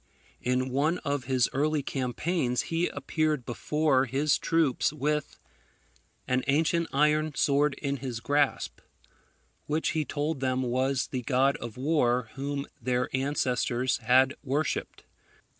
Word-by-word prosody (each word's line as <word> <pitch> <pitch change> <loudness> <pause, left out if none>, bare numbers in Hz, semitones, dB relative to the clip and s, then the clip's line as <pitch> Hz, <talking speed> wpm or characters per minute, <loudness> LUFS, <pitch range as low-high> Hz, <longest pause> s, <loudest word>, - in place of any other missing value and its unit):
In 125 +1 0
one 150 +6 +1
of 140 -2 -1
his 130 -2 +2
early 150 +1 +1
campaigns 130 +1 -1
he 170 +2 +2
appeared 150 -1 -1
before 140 +2 +1
his 140 +4 +1
troops 160 -7 +1
with 150 0 -2 0.9
an 125 0 +1
ancient 165 +4 +2
iron 150 +1 +2
sword 145 +1 +2
in 140 0 -2
his 125 -3 -5
grasp, 145 +3 0 0.9
which 155 +2 0
he 160 -1 0
told 150 0 -2
them 130 0 0
was 130 +2 0
the 130 - -3
god 130 +3 +2
of 120 -1 -8
war 125 -5 +1
whom 140 +1 -3 0.2
their 125 0 0
ancestors 130 -2 0
had 130 +3 +4
worshipped. 145 +3 -2
140 Hz, 125 wpm, -28 LUFS, 130-150 Hz, 0.9 s, had